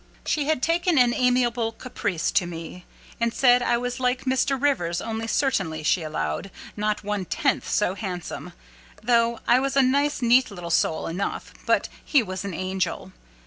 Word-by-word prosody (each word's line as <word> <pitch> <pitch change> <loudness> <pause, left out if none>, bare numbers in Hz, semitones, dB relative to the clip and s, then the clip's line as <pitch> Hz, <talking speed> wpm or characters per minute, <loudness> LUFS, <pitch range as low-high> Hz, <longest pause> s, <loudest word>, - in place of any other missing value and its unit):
She 295 -2 0
had 305 -4 0
taken 340 0 +2
an 245 -2 +5
amiable 245 -3 +1
caprice 205 -7 -3
to 180 -4 +2
me. 170 +1 -8 0.4
She 235 - +3
said 245 +1 +4
I 240 -1 +2
was 245 +1 -3
like 250 +1 0
Mr. 265 +1 +1
Rivers, 180 -12 +1
only, 225 0 -4
certainly, 190 - 0
she 170 +3 +2
allowed, 80 - -3 0.3
"not 210 0 -1
one 205 -1 -2
tenth 275 - 0
so 195 -3 +1
handsome, 180 -3 -6 0.5
though 235 0 +2
I 245 - +5
was 275 +1 -1
a 275 - +6
nice 280 +1 +1
neat 245 +2 +5
little 175 -4 -7
soul 160 -1 +1
enough, 180 +4 -4
but - - +2 0.2
he 280 -5 +3
was 185 -1 -5
an 200 -4 -5
angel." 185 +1 -3
230 Hz, 170 wpm, -24 LUFS, 185-255 Hz, 0.5 s, a